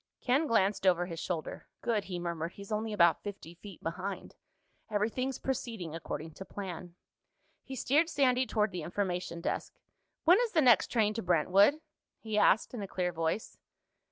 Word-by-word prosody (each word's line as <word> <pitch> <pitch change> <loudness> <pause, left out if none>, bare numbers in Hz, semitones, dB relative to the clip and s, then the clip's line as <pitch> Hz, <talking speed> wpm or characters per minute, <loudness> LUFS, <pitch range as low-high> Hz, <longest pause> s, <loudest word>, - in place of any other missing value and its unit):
Ken 270 +5 +2
glanced 200 -4 +2
over 175 -1 +4
his 165 -2 -6
shoulder. 165 -4 -4 0.2
"Good," 225 -4 0
he 180 -2 -4
murmured. 170 -1 -3
"He's 200 +1 -11
only 215 +1 -1
about 170 -5 +4
fifty 200 -5 -8
feet 180 +1 -12
behind. 185 +4 -5 0.6
Everything's 230 +5 -1
proceeding 225 -10 -4
according 160 -1 -5
to 190 - -9
plan." 180 -3 -7 0.7
He 265 - -8
steered 300 +6 +2
Sandy 260 -4 +2
toward 215 -1 +1
the 180 -2 -4
Information 175 0 -3
Desk. - - -3 0.5
"When 355 +5 +6
is 480 -2 0
the 330 - +4
next 245 -7 +5
train 215 -3 +2
to 225 - -3
Brentwood?" 185 - +4 0.4
he 220 -1 -4
asked 210 +2 +4
in 235 - -4
a 200 - -4
clear 180 -1 -2
voice. 165 +6 -2
200 Hz, 165 wpm, -31 LUFS, 175-230 Hz, 0.7 s, When